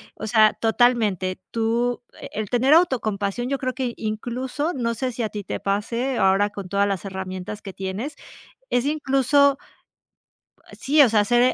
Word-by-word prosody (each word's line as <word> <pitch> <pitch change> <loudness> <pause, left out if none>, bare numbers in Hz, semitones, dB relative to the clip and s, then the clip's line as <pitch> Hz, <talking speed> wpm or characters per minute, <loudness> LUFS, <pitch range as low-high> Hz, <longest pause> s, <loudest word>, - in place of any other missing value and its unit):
o 220 - -6
sea, 215 -1 +5
totalmente 220 -6 +1
tú 235 +2 0 0.2
e - - -8
el 215 -2 -4
tener 255 +4 +3
autocompasión, 240 - +1
yo 275 - 0
creo 255 -1 -3
que, 255 -3 -3
incluso 245 +8 -3
no 235 -3 -1
sé 255 +2 -2
si 235 0 -4
a 220 - -1
ti 205 -1 -6
te - - -4
pase 230 +6 -1
ahora 195 +2 +3
con 200 -3 -8
todas 200 +1 +2
las 195 -1 -2
herramientas 190 +1 -6
que 195 - -8
tienes, 195 +11 -5 0.6
es 245 +2 +1
incluso, 280 -1 +3 1.2
sí 295 +3 +3
o 275 - +8
sea, 215 -2 +3
ser, 240 +3 +3
230 Hz, 165 wpm, -23 LUFS, 205-260 Hz, 1.2 s, o